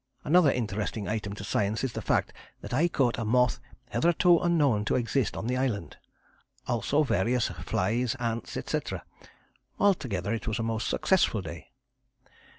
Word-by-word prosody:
Another 155 Hz, -1 st, +5 dB
interesting 105 Hz, -3 st, -3 dB
item 105 Hz, -2 st, -3 dB
to 100 Hz, -, -8 dB
science 100 Hz, +3 st, -1 dB
is 130 Hz, -, -2 dB
the -, -, -4 dB
fact -, -, 0 dB, 0.3 s
that -, -, -7 dB
I 155 Hz, +7 st, +3 dB
caught 130 Hz, -9 st, +1 dB
a -, -, -1 dB
moth 125 Hz, +2 st, +2 dB, 0.3 s
hitherto 170 Hz, +1 st, +4 dB
unknown 145 Hz, -11 st, +2 dB
to -, -, +1 dB
exist 125 Hz, 0 st, 0 dB
on -, -, -4 dB
the 125 Hz, +2 st, 0 dB
island, 120 Hz, -10 st, -2 dB, 0.7 s
also 130 Hz, +5 st, +1 dB
various 120 Hz, 0 st, +1 dB
flies, 110 Hz, +7 st, -1 dB
ants, 115 Hz, -1 st, -3 dB
etc. -, -, -3 dB, 0.8 s
Altogether 115 Hz, -, +1 dB
it 115 Hz, -, -4 dB
was 110 Hz, -, -1 dB
a 115 Hz, -, -2 dB
most 115 Hz, 0 st, -2 dB
successful 145 Hz, -, +2 dB
day. 80 Hz, -1 st, -9 dB
115 Hz, 155 wpm, -28 LUFS, 105-135 Hz, 0.8 s, Another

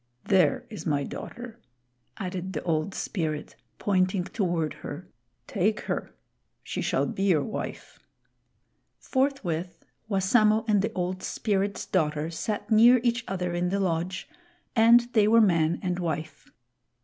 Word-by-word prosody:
There 245 Hz, +7 st, +3 dB
is 210 Hz, -, -6 dB
my 145 Hz, -2 st, +1 dB
daughter," 240 Hz, -, -8 dB, 0.6 s
added 185 Hz, 0 st, -4 dB
the -, -, -4 dB
Old 165 Hz, +3 st, -1 dB
Spirit, 155 Hz, -5 st, -3 dB, 0.2 s
pointing 185 Hz, -1 st, +1 dB
toward 175 Hz, -5 st, -1 dB
her. 175 Hz, +5 st, -7 dB, 0.4 s
"Take 210 Hz, +2 st, 0 dB
her. -, -, -4 dB, 0.5 s
She -, -, -4 dB
shall -, -, +1 dB
be -, -, -4 dB
your 165 Hz, -7 st, +3 dB
wife." 215 Hz, -, -6 dB, 1.0 s
Forthwith 200 Hz, -, -2 dB, 0.2 s
Wassamo 215 Hz, +2 st, +3 dB
and 205 Hz, -2 st, +3 dB
the 220 Hz, +3 st, -1 dB
Old 185 Hz, 0 st, -2 dB
Spirit's 200 Hz, 0 st, -1 dB
daughter 155 Hz, -2 st, 0 dB
sat 210 Hz, +7 st, -4 dB
near 235 Hz, +3 st, +7 dB
each 240 Hz, 0 st, +1 dB
other 180 Hz, -2 st, -2 dB
in 175 Hz, +1 st, 0 dB
the 200 Hz, +2 st, 0 dB
lodge, 180 Hz, 0 st, -1 dB, 0.5 s
and 230 Hz, +1 st, +7 dB
they 210 Hz, -2 st, +4 dB
were 230 Hz, +2 st, +6 dB
man 170 Hz, -6 st, +3 dB
and 180 Hz, -1 st, -1 dB
wife. 160 Hz, -3 st, -4 dB
190 Hz, 135 wpm, -27 LUFS, 175-215 Hz, 1.0 s, near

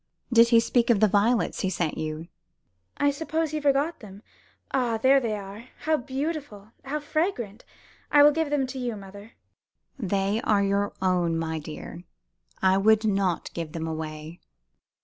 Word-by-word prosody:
Did 230 Hz, 0 st, +7 dB
he 230 Hz, -1 st, +6 dB
speak 235 Hz, +1 st, +1 dB
of 230 Hz, -4 st, +4 dB
the 215 Hz, -, +5 dB
violets 215 Hz, +4 st, +1 dB
he 190 Hz, -, 0 dB
sent 170 Hz, -4 st, -2 dB
you?" 155 Hz, +1 st, -5 dB, 0.7 s
"I 285 Hz, 0 st, +3 dB
suppose 315 Hz, +2 st, -2 dB
he 305 Hz, -1 st, -3 dB
forgot 290 Hz, +3 st, +1 dB
them. 200 Hz, -1 st, -12 dB, 0.5 s
Ah, 240 Hz, -4 st, +1 dB
there 265 Hz, +4 st, +5 dB
they 230 Hz, -4 st, -2 dB
are! 205 Hz, +3 st, -8 dB, 0.2 s
How 315 Hz, 0 st, +2 dB
beautiful! 265 Hz, -6 st, -5 dB
How 290 Hz, +3 st, -3 dB
fragrant! 295 Hz, -, -2 dB, 0.5 s
I 290 Hz, -1 st, +7 dB
will 295 Hz, -, +8 dB
give 320 Hz, 0 st, -1 dB
them 285 Hz, -2 st, +1 dB
to 260 Hz, +1 st, -6 dB
you, 245 Hz, -3 st, -3 dB
mother." 200 Hz, +2 st, -12 dB, 0.7 s
"They 200 Hz, 0 st, 0 dB
are 205 Hz, -2 st, +2 dB
your 200 Hz, +1 st, 0 dB
own, 175 Hz, -3 st, +1 dB
my 160 Hz, -1 st, -2 dB
dear. 155 Hz, +3 st, -9 dB, 0.6 s
I 190 Hz, 0 st, +4 dB
would 220 Hz, +2 st, +4 dB
not 195 Hz, -4 st, 0 dB
give 165 Hz, -2 st, -5 dB
them 165 Hz, -2 st, -4 dB
away." 155 Hz, +1 st, -6 dB
215 Hz, 165 wpm, -26 LUFS, 190-270 Hz, 0.7 s, will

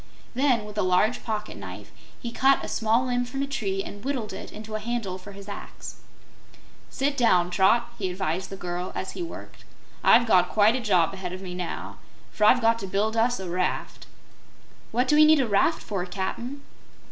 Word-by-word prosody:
Then, 250 Hz, -4 st, +2 dB
with 210 Hz, 0 st, -6 dB
a -, -, +3 dB
large 185 Hz, +6 st, +2 dB
pocket 215 Hz, -1 st, -4 dB
knife, -, -, -9 dB, 0.3 s
he 235 Hz, -, -5 dB
cut 270 Hz, +3 st, +3 dB
a -, -, -6 dB
small 225 Hz, +3 st, +1 dB
limb 245 Hz, -1 st, 0 dB
from 270 Hz, +3 st, -3 dB
a -, -, 0 dB
tree 195 Hz, -8 st, -2 dB
and 205 Hz, 0 st, -9 dB
whittled 260 Hz, -6 st, -3 dB
it -, -, -8 dB
into 215 Hz, +1 st, -9 dB
a 215 Hz, -, -1 dB
handle 215 Hz, -4 st, -3 dB
for 200 Hz, +2 st, -11 dB
his 200 Hz, 0 st, -11 dB
axe. 200 Hz, -, -8 dB, 0.9 s
"Sit 280 Hz, +1 st, -1 dB
down, 180 Hz, -9 st, +3 dB
Trot," 235 Hz, +6 st, +3 dB
he 190 Hz, -3 st, -1 dB
advised 185 Hz, 0 st, -2 dB
the 195 Hz, -, -6 dB
girl, 180 Hz, 0 st, -4 dB
as 190 Hz, -, -3 dB
he -, -, -7 dB
worked. 335 Hz, -, -8 dB, 0.4 s
"I've 240 Hz, -, +6 dB
got 180 Hz, -5 st, +4 dB
quite 215 Hz, +3 st, +4 dB
a -, -, 0 dB
job 185 Hz, -6 st, +2 dB
ahead 185 Hz, -2 st, -5 dB
of 185 Hz, +1 st, -7 dB
me 180 Hz, -1 st, -6 dB
now, 180 Hz, -1 st, -5 dB, 0.3 s
for 210 Hz, -, +1 dB
I've 245 Hz, +3 st, +6 dB
got 230 Hz, 0 st, +3 dB
to 195 Hz, -, -5 dB
build 210 Hz, +4 st, 0 dB
us 235 Hz, +1 st, +2 dB
a 190 Hz, -, -5 dB
raft." 180 Hz, +1 st, -2 dB, 0.8 s
"What 245 Hz, +3 st, +1 dB
do 295 Hz, -, +4 dB
we 305 Hz, -, +7 dB
need 310 Hz, -1 st, +6 dB
a 260 Hz, -, +1 dB
raft 215 Hz, +10 st, +2 dB
for, 195 Hz, -4 st, -3 dB
Cap'n?" 235 Hz, +9 st, -4 dB
215 Hz, 205 wpm, -26 LUFS, 190-245 Hz, 0.9 s, we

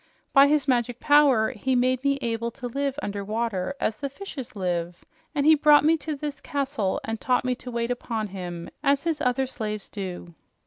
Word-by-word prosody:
By 275 Hz, 0 st, +8 dB
his 295 Hz, 0 st, +2 dB
magic 245 Hz, -2 st, +1 dB
power 285 Hz, -7 st, +4 dB
he 260 Hz, +5 st, -1 dB
made 255 Hz, +1 st, +2 dB
me 280 Hz, 0 st, +2 dB
able 230 Hz, 0 st, -1 dB
to 260 Hz, -, -7 dB
live 275 Hz, +2 st, -2 dB
under 200 Hz, 0 st, -3 dB
water 215 Hz, +1 st, -2 dB
as 215 Hz, -, -1 dB
the 280 Hz, -, -3 dB
fishes 275 Hz, -, -8 dB
live, 175 Hz, -2 st, -3 dB, 0.3 s
and 285 Hz, -1 st, +1 dB
he 315 Hz, -, +8 dB
brought 295 Hz, -1 st, +6 dB
me 320 Hz, +1 st, +5 dB
to 310 Hz, 0 st, -4 dB
this 290 Hz, 0 st, -5 dB
castle 275 Hz, -8 st, -1 dB
and 225 Hz, 0 st, -4 dB
taught 250 Hz, -1 st, +1 dB
me 255 Hz, -, +1 dB
to 255 Hz, -, -9 dB
wait 235 Hz, 0 st, -2 dB
upon 225 Hz, -3 st, -3 dB
him 175 Hz, -3 st, -6 dB
as 280 Hz, 0 st, +2 dB
his 325 Hz, -3 st, -1 dB
other 250 Hz, +1 st, +1 dB
slaves 215 Hz, -5 st, -5 dB
do." 180 Hz, -4 st, -6 dB
250 Hz, 195 wpm, -25 LUFS, 215-280 Hz, 0.3 s, By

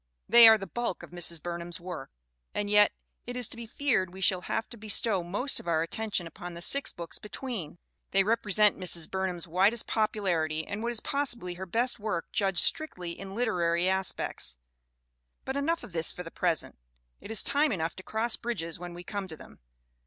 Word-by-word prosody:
They 235 Hz, +1 st, +10 dB
are 220 Hz, 0 st, +9 dB
the 195 Hz, -, -6 dB
bulk 235 Hz, +1 st, -3 dB
of -, -, -11 dB
Mrs. 170 Hz, -2 st, -2 dB
Burnham's 170 Hz, 0 st, -5 dB
work. 175 Hz, -5 st, -6 dB, 0.5 s
And 205 Hz, 0 st, -1 dB
yet 210 Hz, 0 st, +6 dB, 0.4 s
it 245 Hz, 0 st, -4 dB
is 245 Hz, -3 st, +2 dB
to -, -, -5 dB
be 235 Hz, 0 st, -8 dB
feared 220 Hz, -8 st, 0 dB
we 190 Hz, -, -10 dB
shall 185 Hz, -1 st, +3 dB
have 225 Hz, -, -2 dB
to -, -, -6 dB
bestow 210 Hz, -2 st, +2 dB
most 205 Hz, +11 st, 0 dB
of -, -, -11 dB
our 160 Hz, -1 st, +2 dB
attention 205 Hz, 0 st, -1 dB
upon 175 Hz, +1 st, -8 dB
the 170 Hz, -, -7 dB
six 280 Hz, +7 st, +2 dB
books 170 Hz, -1 st, -7 dB
between! 210 Hz, -, -6 dB, 0.3 s
They 195 Hz, 0 st, +4 dB
repre 220 Hz, 0 st, 0 dB
sent 210 Hz, 0 st, +4 dB
Mrs. 170 Hz, -3 st, +2 dB
Burnham's 185 Hz, -2 st, -2 dB
widest 195 Hz, +7 st, +3 dB
popularity 175 Hz, -8 st, 0 dB
and 205 Hz, +1 st, -4 dB
what 235 Hz, +1 st, -1 dB
is 235 Hz, -, -5 dB
possibly 240 Hz, -10 st, -1 dB
her 190 Hz, +2 st, -7 dB
best 240 Hz, +6 st, 0 dB
work 205 Hz, -6 st, -3 dB
judged 195 Hz, -3 st, +2 dB
strictly 180 Hz, -, +1 dB
in 195 Hz, +3 st, -8 dB
literary 175 Hz, -7 st, +1 dB
as 190 Hz, -1 st, +2 dB
pects. -, -, -4 dB, 0.9 s
But 265 Hz, -, -3 dB
enough 325 Hz, +4 st, 0 dB
of -, -, -10 dB
this 165 Hz, -1 st, -1 dB
for 180 Hz, -, -7 dB
the 165 Hz, -, -9 dB
present; 170 Hz, -, -1 dB, 0.4 s
it -, -, -11 dB
is 220 Hz, -2 st, +3 dB
time 290 Hz, +1 st, +3 dB
enough 165 Hz, -5 st, -2 dB
to -, -, -6 dB
cross 220 Hz, +4 st, 0 dB
bridges 170 Hz, -10 st, -3 dB
when 175 Hz, -1 st, -7 dB
we 175 Hz, -, -8 dB
come 200 Hz, +1 st, -4 dB
to 160 Hz, -3 st, -8 dB
them. -, -, -14 dB
195 Hz, 205 wpm, -29 LUFS, 175-225 Hz, 0.9 s, They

